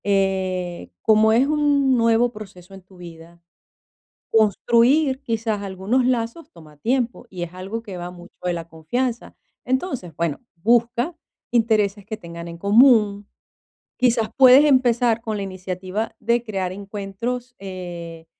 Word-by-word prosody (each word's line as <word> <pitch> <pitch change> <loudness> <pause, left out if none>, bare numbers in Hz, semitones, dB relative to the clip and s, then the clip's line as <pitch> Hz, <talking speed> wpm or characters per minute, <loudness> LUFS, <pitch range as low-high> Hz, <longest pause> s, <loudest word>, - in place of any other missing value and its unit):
Eh, 185 - -1
como 220 0 +5
es 250 +4 +4
un 290 -3 +2
nuevo 230 0 +3
proceso 195 -4 -12
en 195 - -11
tu 185 0 -20
vida, 170 -1 -12 0.9
construir 240 - +3
quizás 225 -4 -2
algunos 200 +6 -1
lazos 245 +5 -2
toma 155 -3 -16
tiempo 240 - -1
y 180 -2 -7
es 175 +1 -11
algo 195 +5 -5
que 195 -4 -8
va 175 0 -6
mucho 175 0 -14
de 180 - +1
la 170 -1 -6
confianza. 230 +10 -3 0.3
Entonces, 260 - -2
bueno, 165 -4 -2 0.2
busca 240 - +1 0.4
intereses 215 -4 +1
que 220 +2 -5
tengan 170 -4 -9
en 170 0 -9
común. 210 0 +4 0.7
Quizás 235 -3 +2
puedes 265 +2 +8
empezar 245 -4 +3
con 220 -2 -3
la 200 - -3
iniciativa 185 +3 -5
de 235 +2 +1
crear 195 -5 -3
encuentros, 205 +6 -5
eh, 175 -4 -8
210 Hz, 135 wpm, -22 LUFS, 185-240 Hz, 0.9 s, puedes